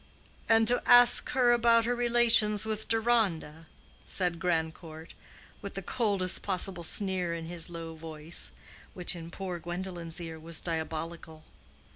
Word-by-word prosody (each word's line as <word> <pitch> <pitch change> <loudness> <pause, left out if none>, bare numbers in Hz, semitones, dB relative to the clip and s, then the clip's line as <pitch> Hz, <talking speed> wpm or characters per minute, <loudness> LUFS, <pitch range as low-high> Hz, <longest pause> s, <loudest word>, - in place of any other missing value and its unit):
"And 225 0 +4
to 245 +1 +3
ask 245 0 +7
her 250 -2 +3
about 235 -1 +3
her 245 - 0
relations 235 -3 +3
with 220 -1 -4
Deronda?" 210 -9 -1 0.4
said 180 -3 -1
Grandcourt, 160 -1 -4 0.5
with 200 - -8
the 195 - -6
coldest 200 -5 0
possible 185 -2 -1
sneer 180 -1 +1
in 165 -1 -7
his 170 0 -3
low 165 -1 -8
voice 160 0 -3 0.4
which 180 0 +2
in 165 -1 -9
poor 180 -1 -6
Gwendolen's 175 -1 -6
ear 165 -2 -8
was 160 0 -1
diabolical. 160 -1 -6
180 Hz, 135 wpm, -28 LUFS, 165-220 Hz, 0.5 s, ask